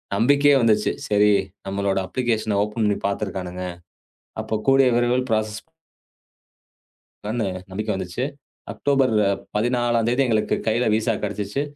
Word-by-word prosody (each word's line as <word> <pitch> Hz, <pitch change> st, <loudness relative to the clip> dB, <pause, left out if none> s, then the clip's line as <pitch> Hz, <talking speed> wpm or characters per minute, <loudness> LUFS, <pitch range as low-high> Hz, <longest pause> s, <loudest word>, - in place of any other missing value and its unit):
நம்பிக்கையே 140 Hz, +6 st, +4 dB
வந்துச்சு. 110 Hz, -2 st, +3 dB, 0.2 s
சரி, 105 Hz, 0 st, +4 dB, 0.4 s
நம்மளோட 100 Hz, 0 st, -1 dB
அப்ளிகேஷன 110 Hz, -2 st, -1 dB
ஓப்பன் 105 Hz, +2 st, -2 dB
பண்ணி 105 Hz, -1 st, +1 dB
பாத்துருக்கானுங்க. 95 Hz, -3 st, -4 dB, 0.8 s
அப்பக் 110 Hz, -1 st, -4 dB
கூடிய 135 Hz, -1 st, +5 dB
விரைவில் 120 Hz, +2 st, +1 dB
பிராஸஸ் 110 Hz, -1 st, -1 dB, 1.7 s
பண்ணேன்னு 100 Hz, -5 st, -2 dB
நம்பிக்கை 105 Hz, +3 st, -3 dB
வந்துச்சு. 95 Hz, +6 st, -4 dB, 0.5 s
அக்டோபர் 135 Hz, -4 st, +1 dB, 0.4 s
14ம் 120 Hz, 0 st, +1 dB
தேதி 125 Hz, +3 st, +2 dB
எங்களுக்குக் 110 Hz, -2 st, 0 dB
கையில 115 Hz, +2 st, +2 dB
விசா 110 Hz, +1 st, +1 dB
கிடைச்சுச்சு. 105 Hz, +5 st, -2 dB
110 Hz, 110 wpm, -22 LUFS, 105-120 Hz, 1.7 s, கூடிய